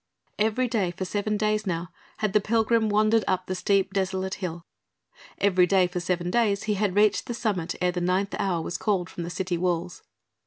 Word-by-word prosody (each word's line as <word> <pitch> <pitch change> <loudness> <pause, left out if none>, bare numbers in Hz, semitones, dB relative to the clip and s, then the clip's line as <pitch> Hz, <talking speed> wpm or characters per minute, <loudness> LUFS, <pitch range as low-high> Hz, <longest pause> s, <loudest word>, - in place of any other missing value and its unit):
Every 220 +4 +2
day 215 -7 0
for 185 +2 -5
seven 210 +2 -1
days 215 0 0
now 170 -1 -2 0.3
had 215 -2 -1
the 210 - +4
pilgrim 225 +1 +2
wandered 215 +1 +3
up 185 -1 0
the 185 - -3
steep 195 +1 +1
desolate 190 -1 -1
hill. 170 -2 -5 0.7
Every 185 -3 +3
day 190 0 +4
for 180 0 -3
seven 175 0 -1
days 210 -4 +2
he 215 - 0
had 200 -2 0
reached 210 +3 +3
the 240 - -3
summit 190 -7 -2
ere 180 0 +2
the 180 0 -3
ninth 185 +3 0
hour 175 -4 0
was 175 - -4
called 185 -4 0
from - - -6
the 170 - -4
city 180 -1 -2
walls. 175 0 -2
190 Hz, 200 wpm, -26 LUFS, 180-215 Hz, 0.7 s, the